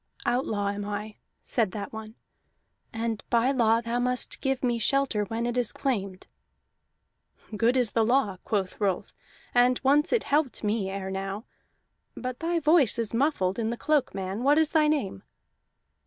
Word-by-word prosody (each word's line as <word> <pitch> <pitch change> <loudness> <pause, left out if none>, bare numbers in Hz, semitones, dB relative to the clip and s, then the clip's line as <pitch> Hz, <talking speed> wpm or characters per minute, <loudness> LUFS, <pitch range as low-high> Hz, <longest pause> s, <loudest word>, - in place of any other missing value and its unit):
"Outlaw 215 -5 0
am 205 0 -3
I," 210 +1 -5 0.3
said 220 -6 0
that 205 0 -6
one, 220 0 -8 0.8
"and 225 -1 -3
by 240 +3 +3
law 230 -3 +3
thou 235 +1 -2
must 250 0 -1
give 270 -1 -1
me 240 -2 +1
shelter 240 -3 +1
when 225 +3 -3
it 240 0 -2
is 245 -3 0
claimed." 200 -9 -3 1.3
"Good 235 +4 +2
is 245 -4 +2
the 225 - +2
law," 230 -5 +2
quoth 200 -2 -2
Rolf, 195 -3 -1 0.4
"and 245 +1 +4
once 285 +3 +3
it 475 - +2
helped 290 -4 0
me 210 -2 0
ere 190 0 -4
now. 195 +3 -4 0.7
But 255 -1 -5
thy 335 +1 0
voice 305 -6 +4
is 230 -2 -2
muffled 230 -7 +1
in 225 -1 0
the 235 - -3
cloak, 300 -7 +1
man. 190 +3 -3
What 285 +3 +4
is 315 -1 +3
thy 310 -2 +4
name?" 265 - -1
230 Hz, 165 wpm, -27 LUFS, 205-265 Hz, 1.3 s, and